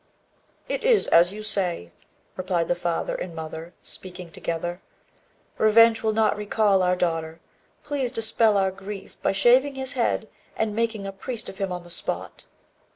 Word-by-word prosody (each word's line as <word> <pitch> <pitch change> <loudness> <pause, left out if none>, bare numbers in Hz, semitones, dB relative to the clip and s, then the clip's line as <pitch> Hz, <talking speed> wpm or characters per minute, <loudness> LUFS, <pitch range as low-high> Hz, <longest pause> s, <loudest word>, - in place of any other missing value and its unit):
"It - - -3
is 475 -3 +4
as 170 +2 +6
you 215 +1 -7
say," 180 - -1 0.4
replied 180 -3 -1
the 175 - +1
father 175 -1 -2
and 175 -2 -5
mother, 160 +2 -7
speaking 180 -2 -9
together. 175 +3 -4 0.8
"Revenge 225 +1 +6
will 220 - +1
not 220 0 +2
recall 205 -1 +2
our 180 0 +3
daughter. 165 -2 -2 0.4
Please 280 -4 -2
dispel 225 -2 +3
our 190 -1 +2
grief, 195 +1 -9
by - - +2
shaving 250 +8 +4
his 265 0 -3
head 235 -3 0 0.3
and 215 -2 -1
making 225 -3 -1
a 195 - -4
priest 225 +4 -6
of 190 - -11
him 195 -2 -1
on 180 -1 -4
the 175 - -12
spot." - - -4
195 Hz, 160 wpm, -25 LUFS, 175-225 Hz, 0.8 s, as